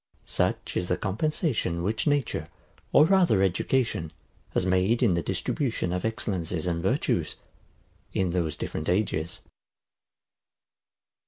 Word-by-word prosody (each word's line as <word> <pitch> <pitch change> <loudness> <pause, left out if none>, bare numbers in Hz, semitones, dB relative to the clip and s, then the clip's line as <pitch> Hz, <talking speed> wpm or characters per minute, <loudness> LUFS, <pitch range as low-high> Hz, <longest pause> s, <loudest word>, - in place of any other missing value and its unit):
Such - - -1
is 90 - 0
the - - +1
compensation, 110 - -1
which 110 - -1
nature, 140 - 0 0.4
or 150 - +7
rather 175 - +4
education, 95 -2 0 0.4
has - - +2
made 95 +7 +2
in 105 -7 +4
the 85 - +1
distribution 95 - -1
of 90 - -2
excellencies 90 -7 -2
and 85 -1 -1
virtues, 95 - 0 0.8
in 95 -2 0
those 85 -3 0
different 75 - -4
ages. 90 -3 0
95 Hz, 115 wpm, -27 LUFS, 85-115 Hz, 0.8 s, or